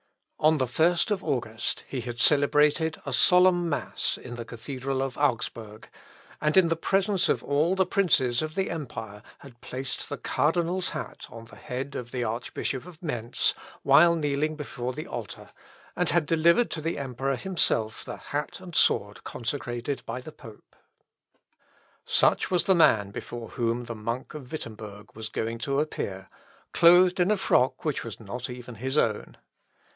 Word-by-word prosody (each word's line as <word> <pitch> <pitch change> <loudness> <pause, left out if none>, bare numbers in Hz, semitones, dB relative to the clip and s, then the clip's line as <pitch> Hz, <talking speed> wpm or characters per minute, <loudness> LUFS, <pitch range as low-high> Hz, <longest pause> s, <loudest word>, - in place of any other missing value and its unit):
On 155 +1 +4
the 130 - +1
first 170 - +2
of 195 -2 0
August, 115 -3 -1
he 130 - -4
had 120 -1 -6
celebrated 150 +3 +3
a 140 - -3
solemn 180 +4 +5
mass 145 - -2
in 125 - -9
the 120 -1 -5
cathedral 130 +3 -4
of 135 -1 -4
Augsburg, 115 -5 -2 0.5
and 150 +4 +2
in 185 -3 +7
presence 190 +4 +1
of - - +1
all 150 +6 +2
the 190 0 +3
princes 145 -11 +2
of 155 0 -4
the 190 -1 -1
empire, 110 -10 -6 0.2
had 125 -4 -15
placed 130 +1 -5
the - - -4
cardinal's 175 +3 0
hat 155 - -6
on 115 0 -10
the 115 - -15
head 130 +3 -5
of 120 -1 -5
the 125 -1 -2
Archbishop 120 +5 -3
of 170 -3 -13
Mentz 120 -7 0 0.3
while 170 +1 +6
kneeling 150 0 0
before 130 -4 -4
the - - -6
altar, - - -7 0.4
and - - 0
had 170 -1 +2
delivered 170 +8 +3
to 160 - -3
the 165 +1 -2
Emperor 135 0 -2
himself 125 - 0
the - - -7
hat 145 +1 -4
and 180 -3 -10
sword 105 +1 +2
consecrated 125 +1 -4
by 115 +2 -3
the 140 +5 -10
pope. 115 -8 -15 1.3
Such - - +3
was 180 -2 +2
the 190 - +4
man 110 - +4
before 115 +2 -7
whom 120 -1 -1
the 120 - -6
monk 115 +3 -4
of 135 -5 -9
Wittemberg 105 -7 -8
was 110 0 -6
going 115 +1 -3
to 140 +4 0
appear, 95 -10 -3 0.5
clothed 180 +2 +6
in 180 +2 +3
a 215 - +3
frock 130 -8 +2
which 150 -3 -1
was 115 -3 -7
not 120 +4 -6
even 125 0 -8
his 130 +6 -3
own. 110 -7 0
135 Hz, 165 wpm, -27 LUFS, 120-165 Hz, 1.3 s, in